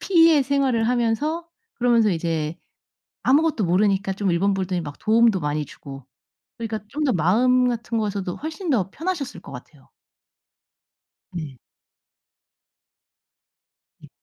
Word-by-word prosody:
P의 330 -5 +5
생활을 260 -4 +1
하면서 250 +8 0 0.3
그러면서 235 -3 +3
이제 165 -2 -2 0.7
아무것도 285 - +2
모르니까 195 +2 +1
좀 195 0 -1
일본 195 +3 +1
분들이 185 -2 -2
막 145 -3 -8
도움도 225 -3 +3
많이 150 0 -2
주고 135 -2 -11 0.5
그러니까 225 -2 -4
좀 300 +4 -3
더 265 - +2
마음 250 +9 +3
같은 230 -1 -3
곳에도 200 -4 -2
훨씬 320 +4 -6
더 195 -7 +1
편하셨을 320 - -4
것 - - -12
같아요. - - -13 1.4
네. 155 -7 -7 2.4
예. - - -14
220 Hz, 260 characters per minute, -23 LUFS, 180-265 Hz, 2.4 s, P의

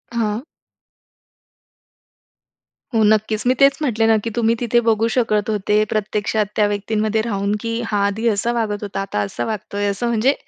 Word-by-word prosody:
हां. 220 -1 -1 2.5
हो, 225 - +3
नक्कीच. 215 0 +2
मी 255 - +5
तेच 275 0 +5
म्हटले 225 -6 +1
ना, 225 - +5
की 230 - -2
तुम्ही 230 -1 +2
तिथे 240 0 +2
बघू 225 -1 +2
शकत 220 -4 +1
होते 210 0 +1
प्रत्यक्षात 215 0 -1
त्या 210 - +3
व्यक्तींमध्ये 215 +1 -1
राहून 205 -2 -1
की 230 0 -2
हा 210 -2 -1
आधी 210 +4 -1
असा 220 +2 0
वागत 215 -3 -2
होता 200 -1 -4
आता 195 - -3
असा 105 +4 -3
वागतोय. 205 -1 -3
असं 205 +4 -1
म्हणजे 235 +4 +2
215 Hz, 160 wpm, -20 LUFS, 205-230 Hz, 2.5 s, मी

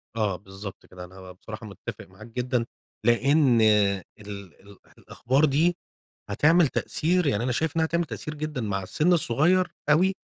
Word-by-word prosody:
آه، 105 -4 0
بالضبط 95 +1 -10
كده، 90 -1 -10
أنا 95 0 -12
بصراحة 110 +4 -10
متّفق 100 -2 -8
معاك 105 +5 -14
جدًا 125 0 -1 0.4
لإن 125 0 +4
ال 100 -3 +3 0.5
الأح 100 0 -19
الأخبار 135 +5 0
دي 160 +5 +2 0.5
هتعمل 155 - +4
تأثير، 175 +5 0
يعني 120 -4 +1
أنا 130 - 0
شايف 160 +5 -1
إنّها 160 0 +3
هتعمل 170 +1 0
تأثير 155 -1 -6
جدًا 150 -3 -4
مع 100 -3 -2
السن 155 - +1
الصغيّر 170 +5 +2 0.2
أوي 185 +6 +4
125 Hz, 150 wpm, -25 LUFS, 100-155 Hz, 0.5 s, لإن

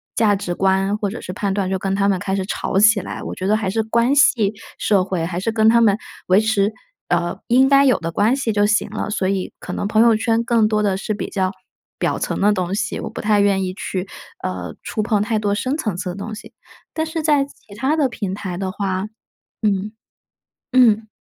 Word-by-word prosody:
价 210 -3 +3
值 185 -3 -3
观 195 +2 +1
或 205 - -1
者 225 - -6
是 180 - -6
判 200 +1 -2
断 195 -2 -1
就 190 0 -1
跟 195 0 -1
他 200 0 +2
们 195 -2 +1
开 195 0 -2
始 190 -1 -2
吵 195 - -2
起 215 0 +6
来， - - -7
我 - - -5
觉 185 - -3
得 215 - +3
还 210 -3 -2
是 225 +2 +1
关 235 +4 +2
系 225 -7 +4 0.2
社 200 -3 +2
会， 185 -3 -2
还 175 +1 -3
是 225 +5 -1
跟 220 0 +3
他 235 +1 +5
们 205 -3 +4 0.3
维 185 +2 +5
持， 215 -2 +1 0.4
呃， 175 0 -1
应 260 +3 +5
该 275 0 +6
有 255 -7 +4
的 165 0 -4
关 215 +9 +2
系 255 -5 -1
就 205 0 +3
行 215 0 +1
了。 215 0 -4
所 200 -3 -1
以 195 -2 -2
可 - - -7
能 200 - -2
朋 215 +1 +3
友 230 -1 +5
圈 225 +1 +1
更 230 -3 +3
多 215 -1 +1
的 200 -2 +1
是 215 +2 -3
比 210 - -4
较 185 -2 -1 0.5
表 - - -1
层 - - -2
的 205 +1 +4
东 185 -1 -2
西， 215 +2 -2
我 - - -5
不 - - -8
太 210 -1 +2
愿 200 -1 +2
意 185 0 -3
去， 195 -2 -4 0.4
呃， 90 -3 -4
触 215 - -3
碰 210 -2 +1
太 220 +1 0
多 205 -1 0
深 260 +6 -1
层 215 - -2
次 185 0 -4
的 175 - -5
东 215 +2 -6
西。 - - -12 0.4
但 315 0 -1
是 320 0 -3
在 295 -3 +3
其 225 -7 -18
它 265 +7 0
的 285 -4 +2
平 200 -6 -4
台 190 -3 -5
的 190 0 -3
话 195 -1 -2 0.6
嗯， 205 0 0 0.8
嗯。 225 -4 +4
205 Hz, 255 characters per minute, -20 LUFS, 190-225 Hz, 0.8 s, 起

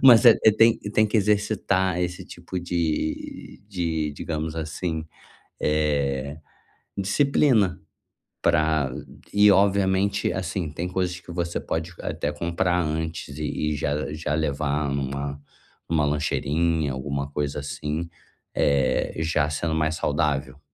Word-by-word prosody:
Mas 125 -2 +8
é, 115 - +9
é 110 - +8
tem 115 +1 +5
tem 105 +1 +1
que 110 - +1
exercitar 100 -3 +1
esse 90 0 -3
tipo 90 -1 -6
de 85 -3 -3
de, 80 -5 -1
digamos 80 +2 -4
assim, 80 0 -3 0.5
eh, 70 -2 0 0.6
disciplina 110 -1 +2 0.6
pra 80 -5 +2 0.4
e 105 0 +6
obviamente, 100 0 +3
assim, 90 -2 -2
tem 85 +4 -4
coisas 90 -1 -1
que 90 - -10
você 85 -1 -2
pode 80 +2 -3
até 75 - -2
comprar 85 +3 0
antes 80 +1 -3
e 75 0 -1
e - - -2
já 75 +1 -2
já 75 -1 -2
levar 75 -1 0
numa 70 +1 -3 0.5
uma 80 -3 +2
lancheirinha, 75 +1 0
alguma 70 +2 -3
coisa 75 0 -2
assim, 75 +3 -4 0.5
eh, 70 -2 +2
já 80 -2 +1
sendo 80 +2 -1
mais 80 0 +1
saudável. 70 -3 -1
80 Hz, 125 wpm, -25 LUFS, 75-90 Hz, 0.6 s, é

